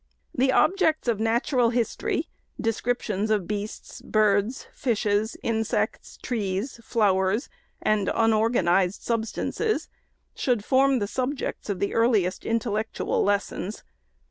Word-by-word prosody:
The 260 +1 +2
objects 320 -3 +2
of 230 -3 +1
natural 235 +2 +2
history, 235 -1 -1 0.2
— - - -42
descrip 230 +2 -1
tions 210 0 -1
of 210 -5 +1
beasts, 210 0 -5
birds, 215 +3 +1
fishes, 215 -3 0
insects, 225 -1 -1
trees, 215 +1 -2
flowers, 200 +1 +1 0.3
and 210 -2 +2
unorganized 215 -5 +2
substances, 235 - -1 0.4
should 240 -5 0
form 270 0 +4
the 205 -4 -1
subjects 260 0 -3
of 200 - -1
the 200 - -1
earliest 220 -6 +2
intellectual 220 -1 -1
lessons. 205 0 -1
220 Hz, 115 wpm, -25 LUFS, 205-245 Hz, 0.4 s, form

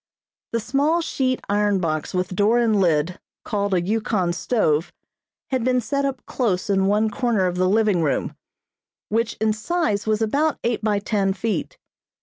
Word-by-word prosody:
The 230 - 0
small 285 +8 +1
sheet 260 -5 -1
iron 205 0 +2
box 155 -3 -2
with 185 0 -2
door 210 +5 +3
and 225 -4 +3
lid, 170 +1 +1 0.3
called 200 -2 0
a 175 - +2
Yukon 195 -2 0
stove, 175 -5 0 0.6
had 260 -3 0
been 255 +1 +2
set 280 +4 -1
up 270 -2 -4
close 205 -6 -1
in 195 -1 +2
one 210 +2 +2
corner 225 -4 +1
of 180 0 -1
the 185 0 +2
living 210 -3 +2
room, 150 -3 -1 0.7
which 230 +2 0
in 220 0 +1
size 220 - -1
was 215 -1 +2
about 280 +8 +1
eight 235 -1 0
by 210 -1 +2
ten 200 -1 0
feet. 225 - -3
210 Hz, 165 wpm, -22 LUFS, 190-240 Hz, 0.7 s, door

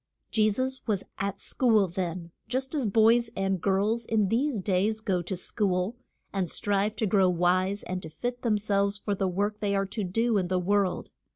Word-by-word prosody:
Je 215 -1 +3
sus 260 +4 -2
was 205 -4 0 0.2
at 200 -1 -2
school 220 -6 +2
then, 175 -1 -4 0.2
just 260 +4 -2
as 280 -7 0
boys 225 +3 +4
and 195 -2 -1
girls 205 +6 +1
in 215 -3 +1
these 250 +1 +1
days 200 +3 +1
go 195 -5 0
to 190 +3 -4
school, 185 +2 -1 0.4
and 190 -3 -1
strive 205 +1 0
to 220 - -1
grow 195 -2 +3
wise 185 +3 +1
and 185 0 -4
to 160 - -8
fit 245 +9 -4
them 220 -3 +2
selves 200 0 +1
for 205 0 -2
the 195 -1 0
work 205 +3 -1
they 200 -1 0
are 195 0 +1
to 205 +2 -4
do 225 +4 +1
in 180 - -1
the 185 0 0
world. 195 +1 0
200 Hz, 195 wpm, -28 LUFS, 185-220 Hz, 0.4 s, boys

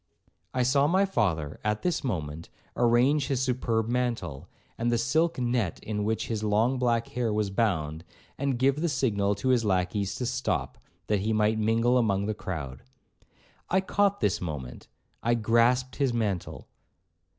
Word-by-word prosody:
I 130 - +1
saw 140 +3 +3
my 190 +5 +3
father, 85 - -1
at 105 0 -1
this 180 -3 0
moment, 80 - -4 0.3
arrange 125 +5 +3
his 130 -2 0
superb 120 -3 0
mantle, 115 - -2 0.3
and 120 +1 0
the 120 - +2
silk 160 +8 +1
net 120 -7 -1
in 105 -1 -2
which 110 +1 -1
his 110 -2 -3
long 110 +5 +2
black 120 -2 +1
hair 120 -2 -1
was 105 -2 0
bound, 80 -7 -1 0.3
and 135 -2 -1
give 135 +4 +2
the 170 - +1
signal 105 -8 +1
to 115 +6 -2
his 125 -3 +3
lacqueys 95 +1 0
to 125 - -3
stop, 130 +1 -2 0.3
that 105 -1 +1
he 110 +3 0
might 110 +1 +2
mingle 115 +3 +3
among 100 -4 +1
the 110 - -1
crowd. 75 -10 -6 0.9
I 190 - +3
caught 200 +1 +1
this 100 - +1
moment,—I 75 - -5
grasped 120 +3 +2
his 135 -4 +1
mantle. 100 -6 -3
115 Hz, 160 wpm, -27 LUFS, 100-125 Hz, 0.9 s, saw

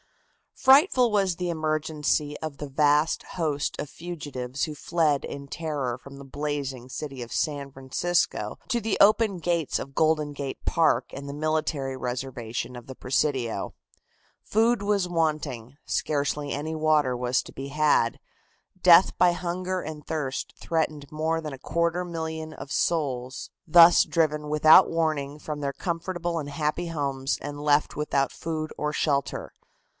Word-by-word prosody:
Frightful 265 - +5
was 195 -4 +2
the 180 0 -3
emergency 155 -2 -1
of 155 -3 -6
the 145 - -6
vast 150 +3 +2
host 150 -4 -1
of 145 - -4
fugitives 145 -7 -5
who 155 - -2
fled 155 -2 +1
in 140 0 -7
terror 140 -6 -3
from 140 +2 -13
the 140 - -10
blazing 135 -3 -4
city 135 -1 -6
of 120 - -7
San 145 -3 -2
Francisco 135 +7 -1
to 240 -3 +1
the 220 -1 -1
open 210 -1 +5
gates 170 -2 0
of 135 0 -8
Golden 155 -2 +2
Gate 140 -1 -6
Park 165 -1 +3
and 140 +1 -7
the - - -5
military 155 -3 -1
reservation 125 -1 -4
of 120 - -9
the 130 - -8
Presidio. 125 -5 -1 0.7
Food 225 0 +2
was 200 -3 +1
wanting, 150 -7 -2
scarcely 145 -1 -1
any 155 +3 -3
water 155 -4 +2
was 125 0 +1
to - - -12
be 135 +1 -7
had, 150 -5 +2 0.6
death 175 0 +7
by 180 - +5
hunger 180 +1 -3
and 155 -2 -7
thirst 145 -4 -3
threatened 155 -3 -2
more 160 +1 -1
than 150 -3 -6
a 135 - -9
quarter 170 +4 0
million 160 -2 -5
of 135 0 -9
souls 130 -6 -1 0.2
thus 170 +1 +8
driven 150 -2 0
without 155 +1 +7
warning 155 -3 -1
from 150 -1 -5
their 140 -1 -2
comfortable 175 0 -3
and 145 -2 -5
happy 150 +4 -2
homes 140 -4 -2
and 145 0 -6
left 150 0 +2
without 140 -2 0
food 155 -1 -4
or 150 0 -1
shelter. 140 -3 -1
150 Hz, 150 wpm, -26 LUFS, 140-165 Hz, 0.7 s, thus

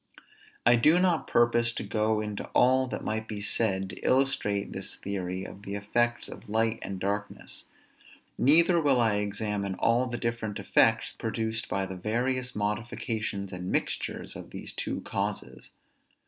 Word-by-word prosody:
I 120 +1 +7
do 155 +8 +5
not 180 -4 +2
purpose 120 0 +3
to - - -3
go 110 0 +1
into 105 -1 -4
all 130 +1 +5
that - - -5
might 110 0 -2
be 105 -2 -5
said 100 -2 0
to - - -9
illustrate 125 -7 +1
this 95 0 -3
theory 95 -1 -4
of 100 - -10
the 100 -1 -5
effects 120 +4 0
of - - -11
light 110 +1 +1
and 95 -1 -5
darkness; 100 +2 -4 0.7
neither 170 +5 +5
will 140 -4 +3
I 110 -3 +3
examine 100 -1 -2
all 120 +5 +2
the 120 -1 -3
different 115 -3 -2
effects - - +3
produced 110 0 -2
by 95 0 0
the 95 -1 -6
various 125 +6 -1
modifications 105 -1 -2
and 90 0 -4
mixtures - - -2
of - - -8
these - - -7
two - - -3
causes. - - -4
110 Hz, 155 wpm, -28 LUFS, 100-120 Hz, 0.7 s, I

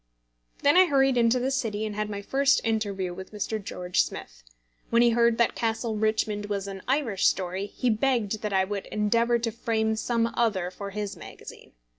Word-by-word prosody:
Then 290 +4 +5
I 370 0 +7
hurried 270 -3 +3
into 235 0 +3
the 260 +2 -1
City, 220 -5 -1
and 210 -1 -5
had 210 0 -2
my 200 -1 -5
first 275 +5 +3
interview 205 -5 -1
with 190 +1 -9
Mr. 215 0 -3
George 180 -1 0
Smith. - - -6 0.5
When 235 +1 +4
he 240 - +5
heard 235 0 +3
that 235 - +2
Castle 225 0 -2
Richmond 215 -1 0
was 200 -1 -3
an 195 -1 -7
Irish 255 -8 +1
story, 185 +2 -1
he 245 +4 -1
begged 220 -3 0
that 210 - -3
I 190 -1 +3
would 200 0 -5
endeavour 230 +3 +1
to 230 -1 -2
frame 220 -1 -1
some 230 +1 0
other 195 -7 0
for 200 +2 -7
his 205 0 -4
magazine. - - -12
220 Hz, 190 wpm, -26 LUFS, 200-235 Hz, 0.5 s, I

